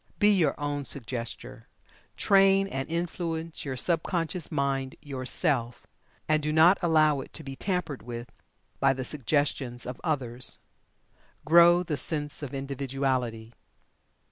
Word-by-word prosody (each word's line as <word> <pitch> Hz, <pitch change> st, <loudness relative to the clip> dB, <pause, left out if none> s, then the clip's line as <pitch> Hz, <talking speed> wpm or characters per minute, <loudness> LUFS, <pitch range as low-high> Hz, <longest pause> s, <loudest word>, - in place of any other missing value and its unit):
Be 210 Hz, 0 st, +5 dB
your 160 Hz, -7 st, +1 dB
own 145 Hz, 0 st, -2 dB
Suggestor 120 Hz, -1 st, -4 dB, 0.5 s
train 195 Hz, 0 st, +4 dB
and 135 Hz, -6 st, -4 dB
influence 165 Hz, -1 st, -3 dB
your 135 Hz, -2 st, -4 dB
sub 165 Hz, +5 st, +1 dB
conscious 170 Hz, -1 st, -1 dB
mind 135 Hz, -2 st, -1 dB
Yourself, 130 Hz, -2 st, -1 dB, 0.4 s
and 155 Hz, 0 st, +2 dB
do 150 Hz, +1 st, -1 dB
not 160 Hz, +5 st, +6 dB
allow 155 Hz, -4 st, +3 dB
it -, -, -11 dB
to -, -, -6 dB
be 135 Hz, 0 st, -7 dB
tampered 180 Hz, -5 st, -3 dB
with 120 Hz, +1 st, -7 dB, 0.5 s
by 135 Hz, 0 st, +4 dB
the 130 Hz, -1 st, -5 dB
suggestions 135 Hz, -3 st, -1 dB
of 125 Hz, 0 st, -7 dB
others. 130 Hz, -6 st, -2 dB, 0.9 s
Grow 170 Hz, +2 st, +6 dB
the 155 Hz, -4 st, -3 dB
sense 145 Hz, +1 st, -1 dB
of 145 Hz, -4 st, -5 dB
Individuality. 135 Hz, -4 st, -2 dB
145 Hz, 130 wpm, -28 LUFS, 130-165 Hz, 0.9 s, not